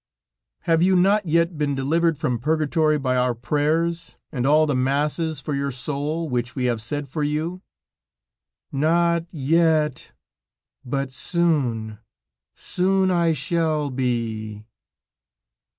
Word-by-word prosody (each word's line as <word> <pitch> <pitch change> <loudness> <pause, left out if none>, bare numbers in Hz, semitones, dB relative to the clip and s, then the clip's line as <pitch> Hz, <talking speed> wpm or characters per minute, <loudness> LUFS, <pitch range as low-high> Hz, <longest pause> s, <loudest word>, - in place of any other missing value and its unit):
"Have 165 -1 +2
you 185 +1 +4
not 195 +2 +3
yet 170 0 +1
been 145 -2 0
delivered 160 +4 +1
from 125 -4 -1
purgatory 155 +2 +1
by 130 -3 -1
our 125 -1 +1
prayers, 155 +7 -1
and 130 -4 -1
all 155 +2 +5
the 145 - 0
masses 145 +4 0
for 150 0 -4
your 140 0 -1
soul, 145 +5 -3
which 125 -2 -2
we 130 -2 -1
have 120 -3 0
said 145 +5 -4
for 150 +4 -4
you?" 155 +5 -2 1.1
"Not 170 +3 +1
yet, 155 -2 +1 0.7
but 135 +1 -3
soon, 130 - -1 0.6
soon 190 +1 +1
I 170 -2 +2
shall 155 0 -1
be." 115 -4 -3
150 Hz, 120 wpm, -23 LUFS, 130-165 Hz, 1.1 s, all